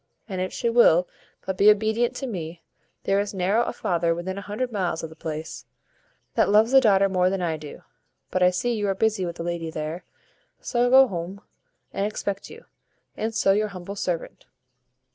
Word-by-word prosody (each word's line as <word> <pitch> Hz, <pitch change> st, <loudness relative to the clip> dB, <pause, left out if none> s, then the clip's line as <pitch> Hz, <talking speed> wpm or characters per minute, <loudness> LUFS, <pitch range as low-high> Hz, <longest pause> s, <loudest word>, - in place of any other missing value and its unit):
And 190 Hz, -4 st, -4 dB
if 185 Hz, -, -2 dB
she -, -, -2 dB
will 205 Hz, -7 st, +5 dB, 0.4 s
but 190 Hz, -1 st, -3 dB
be 205 Hz, -, +7 dB
obedient 220 Hz, +3 st, +2 dB
to 270 Hz, -, -4 dB
me, 170 Hz, -7 st, -6 dB, 0.4 s
there 195 Hz, 0 st, +2 dB
is 205 Hz, 0 st, -3 dB
narrow 195 Hz, +5 st, +2 dB
a -, -, -2 dB
father 170 Hz, -1 st, 0 dB
within 180 Hz, +2 st, -4 dB
a 200 Hz, -, -5 dB
hundred 215 Hz, +5 st, -4 dB
miles 180 Hz, -6 st, -2 dB
o' -, -, -3 dB
the 160 Hz, -, -14 dB
place, 160 Hz, 0 st, -6 dB, 0.7 s
that -, -, +2 dB
loves 215 Hz, +4 st, +4 dB
a 270 Hz, -, +8 dB
daughter 200 Hz, -4 st, +4 dB
better 185 Hz, -1 st, +2 dB
than 190 Hz, -1 st, -2 dB
I 165 Hz, -2 st, 0 dB
do; 150 Hz, -1 st, -10 dB, 0.5 s
but 185 Hz, -, 0 dB
I 180 Hz, -, +6 dB
see 185 Hz, +7 st, -1 dB
you 210 Hz, -2 st, -1 dB
are 195 Hz, -, 0 dB
busy 215 Hz, -3 st, 0 dB
with 170 Hz, -, -5 dB
the 170 Hz, -, -6 dB
lady 170 Hz, -1 st, -3 dB
here, 155 Hz, +2 st, -5 dB, 0.6 s
so 240 Hz, -, -3 dB
I 245 Hz, -, +4 dB
will 265 Hz, +1 st, +7 dB
go 205 Hz, -, -9 dB
huome 180 Hz, +4 st, -5 dB, 0.5 s
and 195 Hz, -, -1 dB
expect 200 Hz, -2 st, -4 dB
you; 465 Hz, +1 st, -13 dB, 0.5 s
and 225 Hz, +1 st, -3 dB
so 195 Hz, -3 st, +3 dB
your 210 Hz, +2 st, +2 dB
humble 195 Hz, 0 st, -8 dB
servant." 180 Hz, -4 st, -4 dB
195 Hz, 205 wpm, -24 LUFS, 175-215 Hz, 0.7 s, a